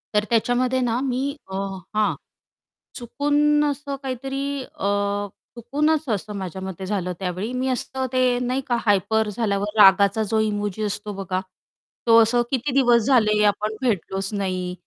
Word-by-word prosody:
तर 210 - +4
त्याच्यामध्ये 245 +3 +1
ना 240 -1 0
मी 260 -1 -1 0.3
अ, - - -4 0.4
हां, 215 -1 +2 0.8
चुकून 290 +4 +1
असं 285 -1 -3
काहीतरी 270 +2 -3
अ, 200 - -5 0.7
चुकूनच 300 +5 0
असं 210 -1 -2
माझ्या 190 -1 -6
मते 190 0 -6
झालं 185 -2 -2
त्यावेळी. 185 +4 -3
मी 255 +1 -1
असं 260 +1 -2
ते 255 -1 +3
नाही 250 +2 -1
का 240 - +1
हायपर 210 +2 +2
झाल्यावर 205 -1 -1
रागाचा 200 +2 +6
जो 220 - +2
इमोजी 210 -1 -1
असतो 210 0 -3
बघा, 190 -1 -3 0.7
तो 230 0 +7
असं 235 +2 +3
"किती 265 +1 -1
दिवस 245 -3 +4
झाले, 215 -5 +4
आपण 210 +1 0
भेटलोच 195 -5 -1
नाही, 185 -3 -2
220 Hz, 145 wpm, -23 LUFS, 200-255 Hz, 0.8 s, तो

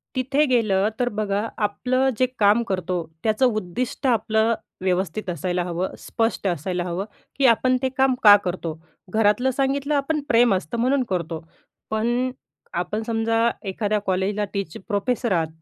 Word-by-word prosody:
तिथे 270 +4 +2
गेलं 215 -5 +2
तर 245 0 +1
बघा, 205 -2 -1 0.2
आपलं 255 +5 +1
जे 255 - +5
काम 210 +3 +4
करतो 185 -1 -1 0.3
त्याचं 220 +3 +2
उद्दिष्ट 215 +7 -3
आपलं 220 -1 +2 0.3
व्यवस्थित 185 +1 -1
असायला 175 +2 -1
हवं, 180 +1 -3
स्पष्ट 225 -3 -1
असायला 175 +1 -1
हवं, 180 +3 -3 0.3
की 275 - +2
आपण 255 +2 +4
ते 265 - +1
काम 265 -1 +3
का 205 -1 +10
करतो? 170 -3 -3 0.3
घरातलं 220 +4 +3
सांगितलं 275 +2 0
आपण 290 +2 0
प्रेम 235 -1 +5
असतं 185 +5 -3
म्हणून 260 +2 +2
करतो. 170 -3 -2 0.5
पण 240 +4 0 0.5
आपण 210 +5 -3
समजा, 225 +1 +1 0.2
एखाद्या 210 +2 0
कॉलेजला 195 +3 0
टीच 195 -6 -3
प्रोफेसर 225 +3 -1
आहात 165 -3 +2
215 Hz, 145 wpm, -23 LUFS, 185-250 Hz, 0.5 s, का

